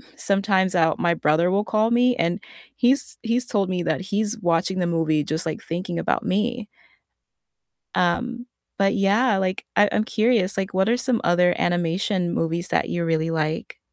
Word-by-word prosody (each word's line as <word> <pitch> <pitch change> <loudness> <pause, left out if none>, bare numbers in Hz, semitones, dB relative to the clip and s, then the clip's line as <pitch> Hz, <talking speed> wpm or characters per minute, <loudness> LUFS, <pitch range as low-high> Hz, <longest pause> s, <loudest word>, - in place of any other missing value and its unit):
sometimes, 195 -2 +1
I'll 160 -2 +3
my 170 -1 +2
brother 165 +3 +2
will 200 +2 +1
call 220 +1 +1
me, 245 +1 +3
and 170 +4 0 0.4
he's 260 +1 +1
he's 240 +2 0
told 200 -5 0
me 180 -1 -1
that - - -1
he's 205 +4 -2
watching 175 +2 +1
the 175 - +1
movie 160 -3 +1
just, 160 +3 -2
like, 160 - -5
thinking 175 +1 -4
about - - -1
me. 220 +3 -1 1.3
Um, 240 +7 -1 0.3
but 195 0 +2
yeah, 205 +3 +2
like, 185 0 -2
I 205 0 +5
I'm 215 - +1
curious, 220 -4 +1
like, 190 -1 -3
what 190 +3 +2
are 235 - +3
some 250 -1 0
other 175 +1 +3
animation 175 +1 0
movies 170 +2 -2
that - - 0
you 170 -1 -2
really 165 0 0
like? 155 0 -3
190 Hz, 170 wpm, -23 LUFS, 170-215 Hz, 1.3 s, I